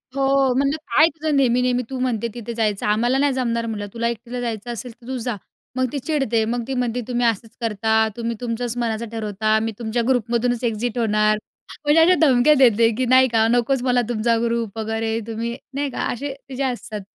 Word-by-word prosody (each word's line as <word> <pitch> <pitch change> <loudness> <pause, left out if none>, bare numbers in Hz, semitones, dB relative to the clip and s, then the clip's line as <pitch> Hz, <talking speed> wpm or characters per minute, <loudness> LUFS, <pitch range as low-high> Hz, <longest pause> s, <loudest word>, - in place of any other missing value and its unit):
हो, 270 -1 +2
म्हणलं, 280 +2 +1 0.2
"काय 310 - +7
तुझं 315 -2 -2
नेहमी-नेहमी? 250 -1 +2
तू 265 -1 -4
म्हणते 235 -3 -1
तिथे 235 -1 -6
जायचं. 215 -3 -1
आम्हाला 235 +5 +2
नाही 280 0 +2
जमणार," 235 -3 -1
म्हणलं, 210 -2 -4
"तुला 235 0 -1
एकटीला 235 +2 -5
जायचं 235 -1 -4
असेल 245 +2 -7
तर 235 - -15
तू 260 0 -3
जा." 240 -1 -3 0.4
मग 255 0 +1
ती 280 - -2
चिडते. 270 -6 0
मग 235 +2 -2
ती 270 - -3
म्हणते, 245 -1 -1
"तुम्ही 245 -1 0
असंच 225 0 -1
करता. 220 0 +1
तुम्ही 235 0 -2
तुमच्याच 240 0 -3
मनाचं 230 -1 -2
ठरवता. 215 -1 0
मी 225 +1 -2
तुमच्या 235 +1 -1
ग्रुपमधूनच 245 -1 0
एक्झिट 235 +1 -1
होणार" 215 -2 +2 0.5
म्हणजे 295 +2 +5
अशा 360 +3 +6
धमक्या 270 -1 +5
देते 230 -3 +5
की 255 - +1
नाही 260 +1 +5
का, 225 -2 +2
नकोच 245 +3 +1
मला 250 -1 +2
तुमचा 230 0 +1
ग्रुप 230 -2 -2
वगैरे, 225 0 -2
तुम्ही 230 +1 -3 0.2
नाही 285 +1 -1
का - - -4
असे 275 +3 -4 0.2
तिचे 265 +1 -3
असतात 235 -5 -4
235 Hz, 195 wpm, -21 LUFS, 225-255 Hz, 0.5 s, काय